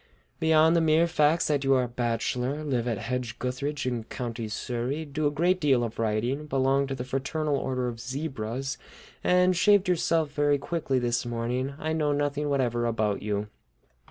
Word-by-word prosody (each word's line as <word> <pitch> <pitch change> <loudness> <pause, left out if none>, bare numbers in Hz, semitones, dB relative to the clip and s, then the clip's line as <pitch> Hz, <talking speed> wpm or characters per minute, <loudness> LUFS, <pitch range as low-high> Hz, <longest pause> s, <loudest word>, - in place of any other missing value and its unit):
Beyond 160 +1 +4
the 170 - +4
mere 160 +1 +4
facts 160 -1 +2
that 145 -2 +1
you 135 0 +4
are 130 - +3
a - - -2
bachelor, 125 +4 -2
live 125 -5 -1
at 115 -3 0
Hedge 120 +1 -3
gutheridge 140 +4 -3
in 120 -3 -2
County 115 -2 -5
Surrey, 125 +7 -3
do 150 +1 -1
a - - +3
great 175 +5 +1
deal 135 -5 +3
of 115 -1 -5
writing, 115 +7 -1
belong 135 0 +2
to 135 - -3
the 125 - -4
Fraternal 140 +4 -1
Order 130 -2 -1
of 115 -1 -5
Zebras, 135 0 -4 0.4
and 180 0 +4
shaved 205 +2 +4
yourself 165 -3 +1
very 145 -1 +2
quickly 140 -2 -2
this 120 -1 0
morning, 120 +3 -2
I 155 0 -2
know 150 -2 +1
nothing 145 0 -1
whatever 120 -4 +1
about 110 -3 0
you." 105 0 -2
135 Hz, 180 wpm, -27 LUFS, 120-150 Hz, 0.4 s, Beyond